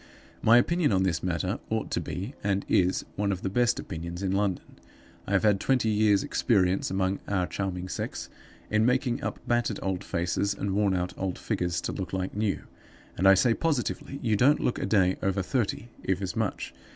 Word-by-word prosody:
My 115 +2 +6
opinion 170 +4 +2
on 95 -1 +3
this 85 -4 0
matter 85 -3 -1
ought - - -2
to - - 0
be, 100 +9 -5
and 100 0 0
is, 90 0 +2
one 100 -1 +1
of 95 -2 -4
the 95 - -1
best 120 +2 +2
opinions 85 +3 -6
in 95 - 0
London. 95 -1 -2 0.5
I 100 - -2
have 100 - +3
had 105 -2 +4
twenty 125 -2 +2
years 105 -2 +3
experience 95 -5 +1
among 95 0 0
our 95 -3 +1
charming 95 -1 -3
sex - - -4 0.4
in 110 0 +3
making 125 0 +1
up - - -3
battered 120 -3 +1
old 95 -2 -2
faces 90 +3 -1
and 100 0 -2
wornout 95 -3 +1
old 95 -1 -2
figures 90 -1 -1
to - - -3
look 95 -2 -5
like 95 0 -2
new, 105 -2 -1 0.5
and 95 - +2
I 95 - +8
say 115 +4 +4
positively 140 -1 -2
you 110 -3 +2
don't 140 +8 +4
look 125 - 0
a - - -2
day 95 -3 +3
over 95 0 0
thirty, 120 +1 -2
if 95 -1 0
as 95 -2 -4
much. 110 -3 -2
100 Hz, 195 wpm, -27 LUFS, 95-110 Hz, 0.5 s, I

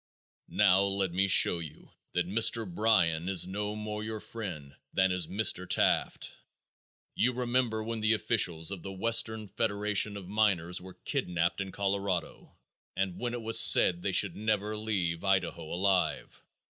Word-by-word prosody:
Now 95 -2 +3
let 100 -2 -1
me 95 +3 +1
show 90 -2 +5
you 80 -3 -10 0.2
that 90 -1 -1
Mr. 115 +2 +3
Bryan 90 -4 +1
is 95 -3 +3
no 105 +3 -4
more 105 0 -5
your 110 0 -5
friend 90 -12 -8 0.2
than 95 0 +1
is 90 -3 -2
Mr. 95 -3 0
Taft. - - 0 0.7
You 125 - +1
remember 120 -2 -1
when 115 0 -4
the 110 +1 +2
officials 90 -7 +1
of 95 -3 -6
the 95 - -8
Western 110 +2 +1
Federation 105 -1 0
of 95 -3 -10
Miners 95 -4 0
were 95 0 -12
kidnaped 85 +1 -2
in 95 0 -6
Colorado, 100 -3 -4 0.4
and 95 -2 -3
when 120 0 -3
it 120 - -7
was 115 0 +4
said 90 -1 +5
they 95 - -2
should 95 -1 +2
never 105 0 -2
leave 95 -6 -3
Idaho 90 -4 -1
alive. 95 +1 -1
100 Hz, 155 wpm, -29 LUFS, 90-110 Hz, 0.7 s, show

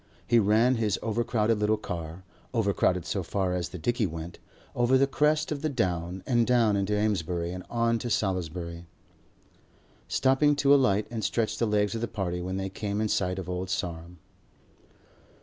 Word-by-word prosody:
He 120 0 +4
ran 110 +4 +3
his 105 -3 0
overcrowded 115 -1 0
little 105 +1 +2
car, 85 0 -6 0.3
overcrowded 100 -5 +1
so 95 +1 -2
far 95 +1 -1
as 90 -1 -2
the - - -7
dicky 120 +4 0
went, 85 +1 -7 0.4
over 120 +2 +3
the 135 - +4
crest 150 +3 +1
of 145 -2 -3
the 155 - 0
Down 90 - -2
and 120 -3 +2
down 115 -4 +3
into 100 +1 0
Amesbury 90 -5 -1
and 90 0 -6
on 115 -1 +1
to 120 - -4
Salisbury, 85 -4 -2 1.2
stopping 135 +3 +3
to 140 0 +4
alight 110 -7 +3
and 115 -2 -4
stretch 110 +1 -1
the 115 - +2
legs 105 0 +1
of 115 - -3
the 120 - -1
party 90 -5 -3
when 95 +1 -3
they 95 0 -2
came 100 +1 -3
in 110 0 0
sight 90 -2 0
of 95 -2 -5
Old 90 0 -3
Sarum. 85 -2 -4
105 Hz, 175 wpm, -27 LUFS, 90-115 Hz, 1.2 s, He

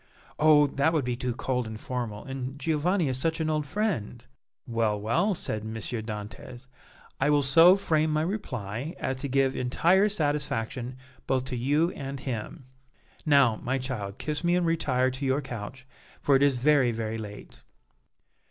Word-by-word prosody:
"Oh! 150 -1 +6
that 140 +3 +1
would 150 -5 +1
be 125 -1 -1
too 125 -1 -3
cold 125 -2 -2
and 110 0 -7
formal, 120 -5 -4
and 135 0 -5
Giovanni 165 +3 +1
is 130 -1 -1
such 160 +4 -1
an 155 -1 0
old 150 -1 -1
friend." 160 - -2 0.4
"Well, 115 -3 0
well," 115 - +1
said 110 -9 -3
M. 110 +1 -6
Dantès, 110 +2 -6 0.5
"I 135 - +2
will 145 -1 +3
so 165 +7 +7
frame 160 -5 +1
my 155 0 +1
reply 135 - -4
as 130 - -2
to 140 +2 -4
give 135 0 +1
entire 175 +11 +3
satisfaction 135 - -2 0.3
both 130 -1 +1
to 130 - -3
you 145 +8 +1
and 135 0 -6
him. 130 +2 -5 0.6
Now, 140 -7 +5
my 130 +3 -2
child, 120 -7 -5
kiss 150 +1 -3
me 175 +1 +3
and 180 -1 +1
retire 130 -6 +1
to 130 +2 -7
your 135 +1 +1
couch, 130 -1 -7 0.3
for 140 - +3
it 135 - +3
is 140 -2 +4
very, 135 -1 +3
very 110 0 -3
late." 105 -1 -10
135 Hz, 170 wpm, -27 LUFS, 120-155 Hz, 0.6 s, so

